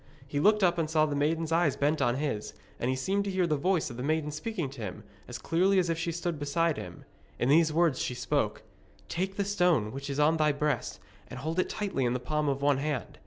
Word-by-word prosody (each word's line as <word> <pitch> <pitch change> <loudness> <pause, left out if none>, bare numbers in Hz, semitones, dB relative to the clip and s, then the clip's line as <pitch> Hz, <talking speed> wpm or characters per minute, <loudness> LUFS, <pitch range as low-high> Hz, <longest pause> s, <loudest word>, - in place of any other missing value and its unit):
He 145 +1 -2
looked 210 +5 +4
up 175 -1 +3
and 155 -2 0
saw 155 -1 +3
the 150 -2 -2
maiden's 160 +3 0
eyes 165 -3 +3
bent 150 +2 +1
on 120 0 +2
his, 135 -7 -3 0.2
and 120 - -1
he 130 - +1
seemed 195 +10 0
to - - -2
hear 185 -2 +1
the 155 -3 +1
voice 170 -1 0
of 120 - -9
the - - -4
maiden 150 +2 0
speaking 170 +2 -3
to 135 -4 -9
him, 95 -4 -6 0.2
as - - -6
clearly 185 +4 +2
as 175 -2 +2
if 165 - -1
she 170 0 -1
stood 170 -2 -3
beside 155 +3 +1
him. 90 -1 -8 0.3
In 120 - 0
these 160 +2 +5
words 160 -4 +2
she 125 - -2
spoke: - - -1 0.5
'Take 190 +2 -2
that 200 - -1
stone 175 - +2
which 140 +3 -6
is 140 +1 -2
on 155 +2 +4
thy 155 -1 +3
breast, 145 -9 -1 0.3
and - - -8
hold 160 +4 -2
it - - +1
tightly 195 -10 -2
in 120 -1 +1
the 125 - -1
palm 150 +4 -1
of 140 0 -2
one 140 -1 +3
hand. 145 -7 -3
155 Hz, 250 wpm, -29 LUFS, 140-170 Hz, 0.5 s, these